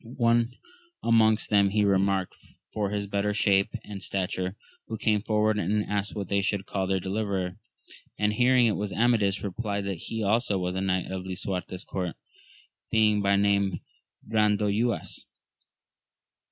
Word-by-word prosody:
One 120 0 +2 0.5
among 110 -2 +5
them 100 -1 +5
he 105 +1 +2
remarked 95 -1 +1 0.4
for 105 -2 -1
his 100 0 -2
better 100 +1 -1
shape 100 -1 +3
and 100 -2 -8
stature, 95 0 -2 0.3
who 110 - -4
came 105 -1 +1
forward 110 0 +1
and 105 0 0
asked 100 0 -2
what 100 -3 -4
they 100 +1 +1
should 100 0 -1
call 95 -2 -2
their 95 0 +1
deliverer; 95 -1 -2 0.6
and 105 0 +1
hearing 125 +1 +4
it 115 - +3
was 105 -1 -3
Amadis, 110 -4 +2
replied 100 0 -3
that 95 -4 -3
he 110 +5 -4
also 105 0 +2
was 90 -1 -2
of 95 +1 -2
King 95 -1 +1 0.2
Lisuarte's 95 0 -4
court, 90 -3 -3 0.7
being 105 -2 +3
by 100 0 +3
name 100 -1 +1 0.5
Brandoyuas. 105 +1 0
100 Hz, 145 wpm, -27 LUFS, 95-110 Hz, 0.7 s, among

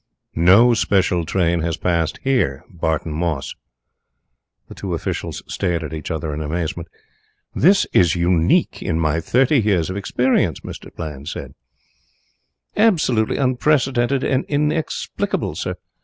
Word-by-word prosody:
"No 100 +9 +6
special 90 -6 +1
train 85 -2 +1
has 80 0 -2
passed 85 -3 0
here. 120 - 0
Barton 80 -2 -2
Moss." 80 -4 -2 1.1
The - - -10
two - - -4
officials - - -4
stared 85 -3 -2
at 80 - -6
each 80 - -6
other 80 -1 -3
in 75 - -4
amazement. 80 +2 -3 0.7
"This 195 +6 +4
is 85 -2 +4
unique 85 -1 +2
in 80 - -1
my 80 0 +1
thirty 130 - +2
years 95 -5 +1
of 95 - -4
experience," 100 - +1
said - - -9
Mr. - - -11
Bland. 75 -3 -6 1.2
"Absolutely 155 - +2
unprecedented 130 -1 +1
and 130 -1 +1
inexplicable, 150 +2 -1
sir. - - -4
90 Hz, 125 wpm, -20 LUFS, 80-125 Hz, 1.2 s, No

